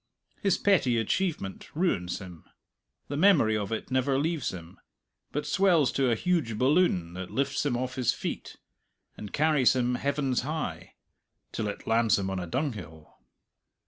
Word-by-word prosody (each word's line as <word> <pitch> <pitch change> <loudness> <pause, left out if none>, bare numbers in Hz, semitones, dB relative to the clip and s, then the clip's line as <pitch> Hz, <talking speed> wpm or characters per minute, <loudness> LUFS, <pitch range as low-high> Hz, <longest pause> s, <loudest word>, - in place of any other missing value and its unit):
His 195 -3 +2
petty 160 -12 +3
achievement 115 - -2
ruins 100 - 0
him. 90 -4 -10 0.6
The 145 - -4
memory 160 - +5
of 105 -1 -3
it 110 +3 -4
never 130 +1 +2
leaves 155 -1 -1
him, 85 -2 -10 0.5
but 150 +1 -3
swells 175 -6 +3
to 135 -2 +1
a 115 - +3
huge 145 -7 0
balloon 130 - +2
that 95 0 -6
lifts 140 0 -1
him 135 -5 0
off 130 +1 -4
his 125 -3 +2
feet - - -5 0.6
and 105 - -8
carries 150 -4 +3
him 125 -1 +1
heavens 140 0 0
high 155 +4 -5 0.6
till 110 - -3
it 100 - -6
lands 115 0 +3
him 95 -1 -2
on 95 - -2
a 90 - -5
dunghill. 100 - -5
130 Hz, 155 wpm, -28 LUFS, 105-150 Hz, 0.6 s, memory